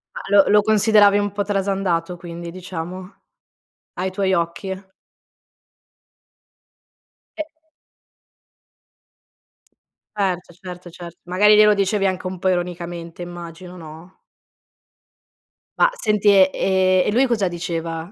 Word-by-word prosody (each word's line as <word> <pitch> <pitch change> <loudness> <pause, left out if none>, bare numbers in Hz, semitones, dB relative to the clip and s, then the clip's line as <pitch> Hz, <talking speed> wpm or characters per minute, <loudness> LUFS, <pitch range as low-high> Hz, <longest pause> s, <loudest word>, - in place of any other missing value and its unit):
Ma - - -5
lo 200 - +7
lo 210 0 +5
consideravi 210 -1 +4
un 205 0 -1
po' 205 +1 -2
trasandato 195 -4 -1
quindi, 170 -1 -8
diciamo? 185 +1 -7 0.8
Ai 185 +1 -3
tuoi 190 0 0
occhi? 190 +3 -3 2.5
Eh 315 0 -4 2.7
Certo, 185 -3 -2
certo, 180 0 -10
certo. 170 0 -11
Magari 210 +4 +5
glielo 210 0 +6
dicevi 200 0 0
anche 185 -1 -3
un 185 0 -6
po' 190 - +1
ironicamente 175 -1 -4
immagino, 175 +1 -9
no? 160 +2 -13 1.6
Ma - - +5
senti, 210 - 0
e 190 -2 +6
e 185 -1 +2
e - - 0
lui 250 +5 +3
cosa 220 -6 0
diceva 170 -1 -5
185 Hz, 110 wpm, -21 LUFS, 175-200 Hz, 2.7 s, lo